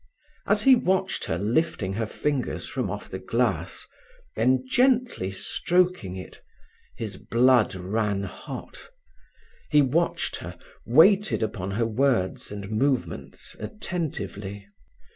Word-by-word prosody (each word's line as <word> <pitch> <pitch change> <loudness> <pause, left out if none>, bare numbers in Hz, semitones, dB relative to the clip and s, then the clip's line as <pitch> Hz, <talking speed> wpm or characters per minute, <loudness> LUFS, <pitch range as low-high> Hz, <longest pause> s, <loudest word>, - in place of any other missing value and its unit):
As 205 +1 +3
he 270 - +8
watched 190 -5 +1
her 80 - -1
lifting 105 - 0
her 110 +2 -2
fingers 140 +3 -2
from - - -2
off - - -5
the - - -6
glass, - - -1 0.5
then 130 0 +2
gently 250 - +2
stroking 175 - 0
it, 95 - -9 0.6
his - - -5
blood 120 -3 +3
ran 100 +2 -1
hot. 100 - -8 0.8
He 150 -1 +5
watched 160 +6 0
her, - - -8 0.3
waited 190 - +5
upon 100 -3 -3
her 115 - +2
words 115 -5 0
and 100 0 -6
movements 110 - -2
attentively. 100 - -5
120 Hz, 115 wpm, -26 LUFS, -, 0.8 s, he